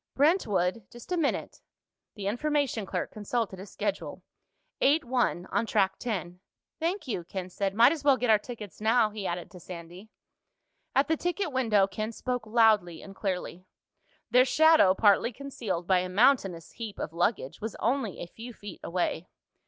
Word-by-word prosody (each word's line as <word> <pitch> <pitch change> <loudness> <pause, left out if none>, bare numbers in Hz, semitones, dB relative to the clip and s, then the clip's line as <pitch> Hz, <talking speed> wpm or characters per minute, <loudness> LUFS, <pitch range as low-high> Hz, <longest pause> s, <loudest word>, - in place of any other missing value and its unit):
"Brentwood? 225 - +2
Just 240 +8 -13
a - - +2
minute." 320 -5 -1 0.5
The 205 -3 -6
information 255 -1 0
clerk - - -3
consulted 215 -2 -3
a 195 - -8
schedule. - - -4 0.6
"Eight 295 +2 +4
one. 240 -8 0
On 230 - 0
Track 195 -3 +1
Ten." 180 -7 -4 0.4
"Thank 335 0 -2
you," 195 -8 -2
Ken 185 +1 -6
said. 195 +1 -2
"Might 235 +4 +7
as 315 -3 -3
well 280 -2 +5
get 245 -2 +2
our 215 - +6
tickets 210 -4 -9
now," 220 0 +3
he 205 -2 -4
added 175 +2 -4
to 185 - -11
Sandy. 175 +4 -10 0.9
At 275 - +4
the 320 0 +1
ticket 355 0 -2
window, 225 -7 +3
Ken 215 +3 -4
spoke 245 0 -4
loudly 215 -7 +3
and 195 -1 -11
clearly. 185 -2 -4 0.6
Their 250 +1 +7
shadow, 315 -8 +5
partly 210 +3 +4
concealed 235 -10 -4
by 185 0 +3
a 180 0 -3
mountainous 195 - +2
heap 225 -3 -7
of 160 - -5
luggage, 175 - -1
was 220 0 -4
only 235 -4 -1
a - - -4
few 230 +7 -10
feet 205 -4 -10
away. 175 0 -2
215 Hz, 170 wpm, -28 LUFS, 185-255 Hz, 0.9 s, Might